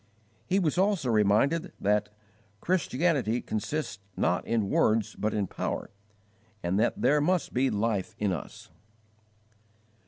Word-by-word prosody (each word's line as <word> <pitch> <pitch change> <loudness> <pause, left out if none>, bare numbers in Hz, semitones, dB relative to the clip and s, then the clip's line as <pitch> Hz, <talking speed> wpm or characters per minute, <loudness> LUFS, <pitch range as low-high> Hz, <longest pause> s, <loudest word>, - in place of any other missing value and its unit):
He 190 - +2
was 175 -3 +1
also 190 - +2
reminded 110 - +2
that 105 +1 +1 0.5
"Christianity 145 - +1
consists 110 -2 -3 0.2
not 90 - +1
in 115 -3 +1
words 110 0 +2
but 110 - -1
in 105 -2 0
power, - - -4 0.7
and 90 +3 0
that 115 - +1
there 150 +1 +3
must 180 +3 0
be 130 +2 +2
life 105 -2 -1
in 105 -2 0
us." 85 - -8
115 Hz, 125 wpm, -28 LUFS, 105-155 Hz, 0.7 s, there